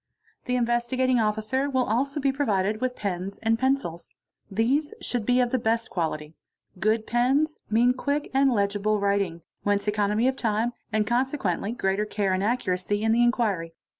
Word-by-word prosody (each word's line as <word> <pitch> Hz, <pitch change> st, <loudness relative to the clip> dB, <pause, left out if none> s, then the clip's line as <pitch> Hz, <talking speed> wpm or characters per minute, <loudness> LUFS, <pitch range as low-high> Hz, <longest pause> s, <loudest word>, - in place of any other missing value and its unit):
The 250 Hz, -, 0 dB
Investigating 245 Hz, +1 st, +1 dB
Officer 220 Hz, +6 st, 0 dB
will 260 Hz, -2 st, +1 dB
also 270 Hz, +6 st, 0 dB
be 275 Hz, -1 st, +2 dB
provided 215 Hz, -6 st, 0 dB
with 255 Hz, -1 st, -1 dB
pens 195 Hz, -1 st, -4 dB
and 225 Hz, +1 st, +2 dB
ils. 260 Hz, -11 st, -1 dB, 0.3 s
These 270 Hz, -, 0 dB
should 240 Hz, -4 st, -3 dB
be 250 Hz, 0 st, +4 dB
of 245 Hz, -1 st, +2 dB
the 255 Hz, -, +1 dB
best 230 Hz, +1 st, 0 dB
quality. 155 Hz, -3 st, -3 dB, 0.5 s
Good 215 Hz, +3 st, +1 dB
pens 270 Hz, +6 st, +1 dB
mean 235 Hz, +3 st, +4 dB
quick 285 Hz, +3 st, -2 dB
and 270 Hz, +1 st, +4 dB
1 205 Hz, -5 st, +2 dB
dle 210 Hz, +1 st, 0 dB
writing, 200 Hz, -5 st, 0 dB, 0.2 s
whence 205 Hz, 0 st, 0 dB
economy 210 Hz, +3 st, +1 dB
of 260 Hz, -, +1 dB
time 230 Hz, -1 st, 0 dB, 0.2 s
and 215 Hz, -1 st, +1 dB
consequently 240 Hz, -, 0 dB
greater 200 Hz, -3 st, 0 dB
care 205 Hz, -2 st, -1 dB
and 185 Hz, -, 0 dB
re 205 Hz, -, +2 dB, 0.3 s
y 185 Hz, +3 st, -2 dB
in 220 Hz, +2 st, +1 dB
the 235 Hz, +2 st, +3 dB
inquiry. 210 Hz, -9 st, +1 dB
225 Hz, 170 wpm, -26 LUFS, 205-255 Hz, 0.5 s, be